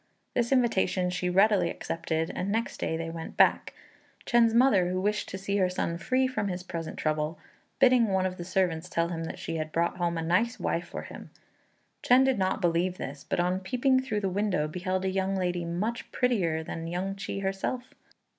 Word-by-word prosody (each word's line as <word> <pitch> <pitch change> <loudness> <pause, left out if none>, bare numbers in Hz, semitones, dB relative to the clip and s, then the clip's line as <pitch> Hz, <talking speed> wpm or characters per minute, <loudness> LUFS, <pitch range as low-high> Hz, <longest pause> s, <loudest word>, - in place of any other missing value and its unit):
This 235 0 0
invitation 200 -7 +2
she 180 0 -1
readily 195 -1 +4
accepted, 165 -1 -2
and 195 +2 -2
next 225 +2 -1
day 160 - -1
they 165 0 -4
went 165 -1 -7
back; - - +3 0.5
Chên's 235 -2 +4
mother, 215 -8 +4
who 185 0 -1
wished 210 +2 -1
to 190 - -5
see 200 +1 -2
her 185 -2 +3
son 170 -2 -2
free 260 +7 +1
from 255 -5 -1
his 180 -1 -4
present 165 -3 -6
trouble, 155 +1 -1 0.4
bidding 250 -3 +5
one 190 -2 +1
of 185 0 -2
the 175 - -5
servants 180 -2 0
tell 170 -1 0
him 165 -1 -3
that - - -6
she 165 - -4
had 155 0 -3
brought 170 +2 0
home 170 -1 0
a 165 - -2
nice 210 +9 +1
wife 170 +1 -1
for - - -6
him; - - -10 0.7
Chên 255 +2 +5
did 265 -5 +2
not 190 +2 0
believe 175 +1 +1
this; 140 +1 -6
but - - 0
on 180 +1 +1
peeping 250 +7 +2
through 215 -5 -2
the 195 - 0
window 190 -5 0
beheld 185 +3 -2
a 190 - +1
young 190 0 0
lady 180 -2 -1
much 205 +8 -3
prettier 210 -11 +1
even 160 - -5
than 165 +1 -5
Yün 190 +2 -2
ch'i 195 0 -5
herself. 195 +6 -3
185 Hz, 205 wpm, -28 LUFS, 170-210 Hz, 0.7 s, bidding